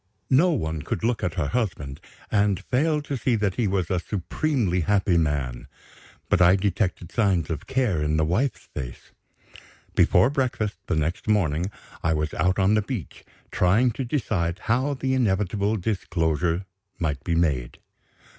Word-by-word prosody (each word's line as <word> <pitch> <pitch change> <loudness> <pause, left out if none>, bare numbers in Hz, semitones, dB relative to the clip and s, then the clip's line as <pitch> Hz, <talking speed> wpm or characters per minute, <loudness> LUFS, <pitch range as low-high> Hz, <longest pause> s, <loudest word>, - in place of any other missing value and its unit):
No 155 +8 +5
one 80 - -1
could - - -4
look 115 -1 0
at 90 -3 -1
her 75 -4 -1
husband, 85 - -2 0.3
and 100 -3 +2
fail 150 +3 +2
to 145 - -3
see 125 -1 +1
that 105 -3 0
he 115 0 0
was 95 -3 -1
a 90 - +2
supremely 105 - -1
happy 95 +1 +2
man. 70 -7 -1 0.6
But 90 - +2
I 90 +1 +7
detected 95 -3 -1
signs 95 -8 +1
of 80 -2 -5
care 120 - +1
in 75 +1 +1
the 80 - +2
wife's 100 - 0
face. 60 -4 -7 0.8
Before 90 +9 +4
breakfast 125 -7 -1
the - - 0
next 80 +6 -2
morning 90 -5 +1 0.3
I 80 - +1
was 75 0 -1
out 90 +4 +1
on 100 +1 +3
the 110 - +3
beach, 105 - -6 0.3
trying 105 +8 +3
to 130 - -4
decide 100 - -1
how 130 +6 +1
the 130 0 -1
inevitable 105 -3 +1
disclosure 85 -3 -1 0.3
might 75 -5 -2
be 85 - 0
made. 70 -8 0
95 Hz, 160 wpm, -25 LUFS, 80-115 Hz, 0.8 s, I